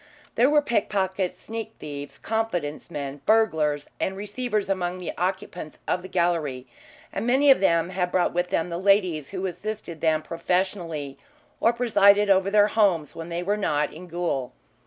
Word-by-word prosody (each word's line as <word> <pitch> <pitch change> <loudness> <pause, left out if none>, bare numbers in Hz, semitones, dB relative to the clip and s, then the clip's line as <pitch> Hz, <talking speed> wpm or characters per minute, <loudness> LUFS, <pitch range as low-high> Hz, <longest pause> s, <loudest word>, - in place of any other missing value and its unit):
There 245 +4 +4
were 295 0 +4
pickpockets, 190 -6 0
sneak 225 0 -6
thieves, 145 -1 -7
confidence 180 -11 -2
men, 140 -3 -5
burglars, 160 -10 +2
and 190 0 -1
receivers 210 0 -2
among 185 -2 -1
the 180 - -5
occupants 180 -3 -3
of 180 - 0
the 185 - -8
gallery, 165 -8 0 0.5
and 220 - -2
many 275 +3 +5
of 265 - +5
them 170 -2 +2
had 180 -1 -1
brought 180 -1 +1
with 175 +1 0
them 165 +1 -1
the 170 - -3
ladies 185 -7 +2
who 190 -1 -4
assisted 190 -3 -5
them 155 -1 +2
professionally 165 -4 -2 0.4
or 230 - +4
presided 210 -4 +4
over 190 0 +3
their 205 0 +5
homes 190 -9 +2
when 165 +1 -7
they 170 +1 -3
were 205 +3 0
not 150 -7 0
in 180 +3 -10
gaol. 170 -7 -2
185 Hz, 165 wpm, -25 LUFS, 165-205 Hz, 0.5 s, many